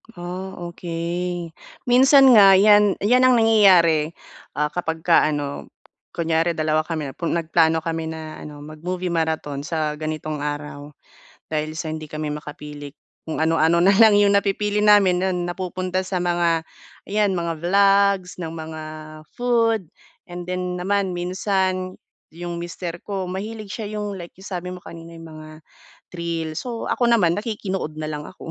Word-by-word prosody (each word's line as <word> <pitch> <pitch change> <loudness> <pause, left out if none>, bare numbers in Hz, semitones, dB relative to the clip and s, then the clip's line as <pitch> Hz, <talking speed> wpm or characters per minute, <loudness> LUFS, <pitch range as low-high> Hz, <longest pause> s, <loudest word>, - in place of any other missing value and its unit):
Ah, 180 +2 -6 0.2
okey. 170 0 -4 0.3
Minsan 265 +2 +6
nga 195 -4 +8
'yan 205 0 +5
'yan 250 +4 +5
ang 255 - +5
nangyayari, 185 -9 +4 0.4
ah, 150 0 0
kapagka 165 0 +2
ano, 145 -2 -4 0.5
kunyari 165 0 0
dalawa 155 0 +1
kami, 155 -5 -3
pu 165 +5 -5
nagplano 165 -1 +2
kami 165 -1 -3
na 160 -1 -7
ano, 145 -1 -10
mag-movie 175 +4 -5
marathon 160 -3 -2
sa 155 -3 -2
ganitong 155 -1 -4
araw. 145 0 -6 0.6
Dahil 155 0 -2
sa 160 -1 -4
hindi 155 0 -6
kami 155 0 -4
makapili, 150 -1 -8 0.3
kung 160 0 -1
ano-ano 165 +1 +3
na 195 - +6
lang 220 -2 +7
'yong 205 0 +4
napipili 205 +1 -1
namin. 205 -4 +5
'Yon 180 -2 -1
napupunta 185 +1 -3
sa 180 -2 -2
mga 170 -2 +1 0.4
'yan, 205 -1 0
mga 170 -1 -2
vlogs 195 +1 +2
ng 165 -2 -5
mga 160 -1 -7 0.5
food, 230 -7 +1 0.3
and 175 0 -9
then 180 0 -3
naman 195 +1 0
minsan 185 +1 -2 0.3
'yong 170 +1 -6
mister 175 0 -6
ko, 195 -3 -4
mahilig 210 +2 -6
siya 215 -2 -6
'yong 205 -1 -4
like 175 -2 -9
'yong 195 - -10
sabi 180 +1 -5
mo 180 - -8
kanina, 170 -1 -11
'yong 165 - -10
mga 155 0 -10 0.6
thrill. 165 -2 -4
So 235 -2 -5
ako 245 - +1
naman, 205 -8 +3
nakikinood 200 -7 -4
na 155 0 -5
lang 150 -1 -5
ako. 185 - -10
175 Hz, 150 wpm, -22 LUFS, 160-195 Hz, 0.6 s, nga